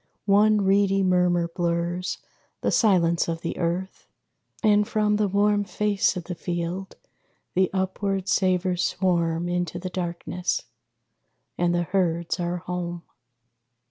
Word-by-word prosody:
One 210 +1 +4
reedy 195 0 +3
murmur 180 -2 +2
blurs 170 +1 -2 0.4
The - - +1
silence 175 -6 +3
of 165 -1 -3
the 165 - -3
earth; 175 +3 -3 0.6
and 210 -1 +4
from 210 -1 +1
the 210 -1 +2
warm 205 +1 +2
Face 205 -1 0
of 175 - -4
the 180 - -5
field 175 +2 -4 0.6
the 185 0 +2
upward 190 0 -1
savors 185 -2 +1
swarm 170 -3 0
Into 175 -1 -2
the 180 +1 -5
darkness. 175 0 -3 0.9
And 175 0 +1
the 175 - +1
herds 170 -2 0
are 175 0 -1
home. 175 -1 -5
180 Hz, 125 wpm, -25 LUFS, 175-195 Hz, 0.9 s, One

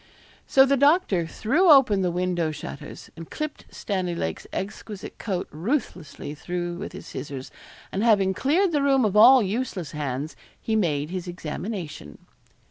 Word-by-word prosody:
So 270 0 +6
the 275 +1 +2
doctor 280 - +3
threw 290 - +2
open 255 -9 +6
the 180 - +1
window 175 -2 -1
shutters, 150 -2 -8
and 165 -1 -10
clipped 305 -1 -5
Stanley 185 -4 -3
Lake's 80 - -4
exquisite 205 0 -6
coat 185 -4 -3
ruthlessly 170 - -3
through 175 +3 -4
with 200 - -7
his - - -9
scissors, 135 -2 -7 0.4
and 200 - -1
having 200 -5 +4
cleared 335 - +2
the 295 -3 +1
room 270 -3 +3
of 205 -1 0
all 245 +3 +8
useless 200 - -3
hands, 145 0 -4 0.2
he 220 - -2
made 155 -7 0
his 185 -1 -4
examination. 175 - -6
190 Hz, 150 wpm, -25 LUFS, 165-250 Hz, 0.4 s, all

